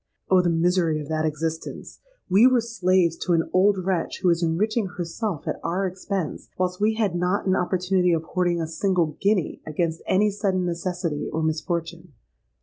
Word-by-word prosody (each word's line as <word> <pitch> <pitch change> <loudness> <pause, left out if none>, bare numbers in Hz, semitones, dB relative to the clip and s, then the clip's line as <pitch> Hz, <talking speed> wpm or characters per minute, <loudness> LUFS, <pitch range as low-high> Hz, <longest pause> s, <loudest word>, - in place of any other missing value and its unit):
Oh! 185 -1 +6
the 175 - +1
misery 170 -1 +2
of 150 0 -7
that 155 0 0
existence! 160 +1 -5 0.3
We 200 +6 +6
were 255 -1 +4
slaves 185 -7 +1
to 180 - -1
an 165 -1 +2
old 195 +2 +4
wretch 185 -2 -2
who 180 - +4
was 170 0 +2
enriching 205 +6 0
herself 175 0 -4
at - - -2
our 185 +3 -1
expense, 185 -2 -4
whilst 180 +1 -1
we 220 +1 +2
had 215 -5 0
not 180 +3 0
an 190 -1 +2
opportunity 180 0 +1
of 165 -1 +1
hoarding 175 0 0
a 165 - -1
single 165 -2 0
guinea 200 -5 +1
against 160 +1 -2
any 205 +3 +3
sudden 195 -3 -1
necessity 175 -3 -3
or 160 - -2
misfortune. 165 +1 -3
180 Hz, 175 wpm, -24 LUFS, 165-190 Hz, 0.3 s, Oh